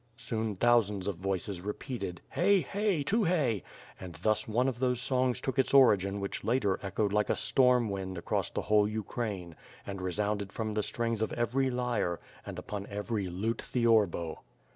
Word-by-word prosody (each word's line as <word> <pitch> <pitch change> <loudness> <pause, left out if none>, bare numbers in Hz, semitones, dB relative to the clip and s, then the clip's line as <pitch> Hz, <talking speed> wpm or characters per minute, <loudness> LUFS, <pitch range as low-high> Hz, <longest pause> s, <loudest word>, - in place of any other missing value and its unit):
Soon 110 -2 -2
thousands 105 -3 +3
of 100 -4 -2
voices 95 0 -2
repeated, 105 -2 -5
"Hey! 195 +2 +4
hey! 200 -6 0
Tukhay!" 165 - +1 0.4
And 90 -3 -8
thus 110 +7 0
one 120 +4 +1
of 125 -3 -2
those 125 -2 +1
songs 130 -1 +1
took 135 +1 -2
its 130 +1 +2
origin 100 -7 +5
whicli 100 0 -4
later 110 -5 +1
echoed 100 +1 -1
like 105 0 +2
a - - +3
storm 125 -3 +3
wind 95 -2 -4
across 85 - -1
the - - -3
whole 105 -1 +4
Ukraine, 105 -5 -4 0.3
and 100 -1 -5
resounded 100 +2 -1
from 110 0 -3
the 105 - +1
strings 115 +1 -1
of 110 - 0
every 130 +3 +1
lyre 120 -8 -1 0.3
and - - -5 0.3
every 105 0 -2
lute 100 +6 -2
theorbo. 110 -9 +1
110 Hz, 165 wpm, -30 LUFS, 100-125 Hz, 0.4 s, origin